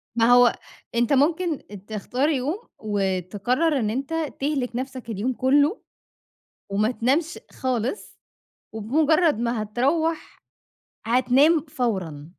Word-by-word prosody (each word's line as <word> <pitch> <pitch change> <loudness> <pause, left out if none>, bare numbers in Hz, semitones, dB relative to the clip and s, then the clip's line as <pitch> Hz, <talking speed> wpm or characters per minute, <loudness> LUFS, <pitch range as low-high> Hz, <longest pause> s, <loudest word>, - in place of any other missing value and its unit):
ما 230 - +3
هو 245 0 +6 0.4
أنت 240 +4 +2
ممكن 315 +3 +2
أ - - -7
تختار 215 +8 -2
يوم 290 +5 -1 0.2
وتقرّر 205 - 0
إن 215 -2 0
أنت 270 +7 -3 0.3
تهلِك 270 -4 -2
نفْسك 255 -2 -5
اليوم 225 +5 -2
كلّه 285 - +2 0.9
وما 210 +4 +1
تنامش 285 +8 0
خالص، 255 - -3 0.5
وبمجرّد 300 +6 +2
ما 235 -2 -1
هتروّح 305 +9 -1 0.6
هتنام 260 +7 +3
فورًا. 185 - -3
250 Hz, 105 wpm, -24 LUFS, 220-290 Hz, 0.9 s, هو